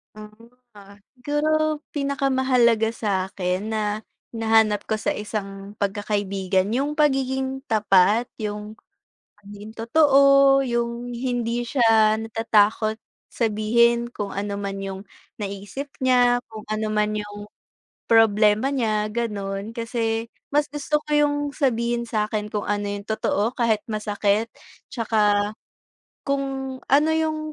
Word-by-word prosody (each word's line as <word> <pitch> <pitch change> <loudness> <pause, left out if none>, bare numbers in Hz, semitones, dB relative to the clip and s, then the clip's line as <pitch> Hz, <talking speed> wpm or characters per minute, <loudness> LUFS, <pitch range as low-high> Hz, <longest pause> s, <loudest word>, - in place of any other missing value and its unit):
Mm. 215 +2 -13 0.2
Ah, 200 0 -15 0.2
siguro 305 +3 0 0.2
pinakamahalaga 260 -5 +2
sa'kin 190 -1 -2
na, 215 0 -2 0.3
hinahanap 220 -2 +3
ko 220 - 0
sa - - 0
isang 200 -1 -6
pagkakaibigan, 200 -2 -1
yung 280 +5 -1
pagiging 265 -2 0
tapat, 210 +2 +3
yung 210 0 -5 0.6
maging 205 +1 -11
totoo, 275 +2 +5
yung 235 -1 -2
hindi 240 -1 -2
siya 225 -3 +3
natatakot 220 -1 +1 0.3
sabihin 235 +2 +2
kung 205 -4 -5
ano 200 0 -3
man 195 -1 -4
yung 195 0 -5 0.4
naisip 205 +7 -6 0.2
niya, 245 -1 +3
kung 215 -1 -8
ano 215 0 -2
man 210 0 0
yung 205 0 -6 0.6
problema 220 +3 +4
niya, 215 -5 0
gano'n. 205 -3 -3
Kasi 230 -1 -2 0.2
mas 295 +1 +2
gusto 295 +1 -1
ko - - -15
yung 295 0 +3 0.2
sabihin 235 -4 0
sa'kin 210 -1 -2
kung 210 -1 -3
ano 205 0 -1
yung 200 0 -5
totoo, 220 +1 -1
kahit 225 -4 +1
masakit, 210 0 -1 0.4
tsaka, 210 -3 +1 0.7
kung 270 -1 -2
ano 295 +3 +4
yung 315 -1 0
225 Hz, 115 wpm, -23 LUFS, 210-255 Hz, 0.7 s, totoo